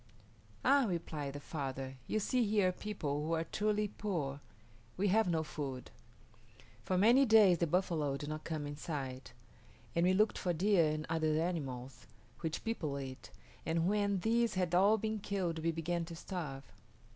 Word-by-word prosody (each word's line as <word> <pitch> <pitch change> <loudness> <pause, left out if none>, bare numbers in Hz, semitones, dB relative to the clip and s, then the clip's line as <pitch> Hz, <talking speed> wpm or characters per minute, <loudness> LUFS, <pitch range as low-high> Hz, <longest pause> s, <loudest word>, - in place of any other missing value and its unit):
"Ah," 275 0 +5
replied 155 -6 -3
the 145 - -6
father, 135 -3 -5
"you 215 - 0
see 245 +4 +1
here 205 -3 +3
people 155 -8 -3
who 160 +2 -1
are 165 0 +1
truly 210 +4 0
poor. 165 -10 -3 0.6
We 200 +2 +2
have 220 +1 +3
no 160 -2 +1
food. 135 -5 -5 0.9
For 185 - 0
many 235 +8 +6
days 215 - +6
the 170 - +2
buffalo 160 -5 0
did 145 - -6
not 155 0 -4
come 155 -3 -3
in 145 0 -5
sight, 135 -5 -5 0.6
and 170 - +3
we 185 +1 +4
looked 215 +2 +2
for 180 - 0
deer 175 -2 +3
and 155 0 -2
other 160 -1 +1
animals, 135 -7 -4 0.3
which 160 -1 -3
people 160 -11 -2
eat, 130 -1 -8 0.3
and 165 +1 +1
when 200 -1 +1
these 230 +1 +2
had 180 -2 0
all 200 +5 +5
been 220 0 -2
killed 190 -5 -2
we 165 +1 +1
began 170 +1 -2
to 165 0 -8
starve. 160 -7 -5
170 Hz, 170 wpm, -34 LUFS, 150-205 Hz, 0.9 s, many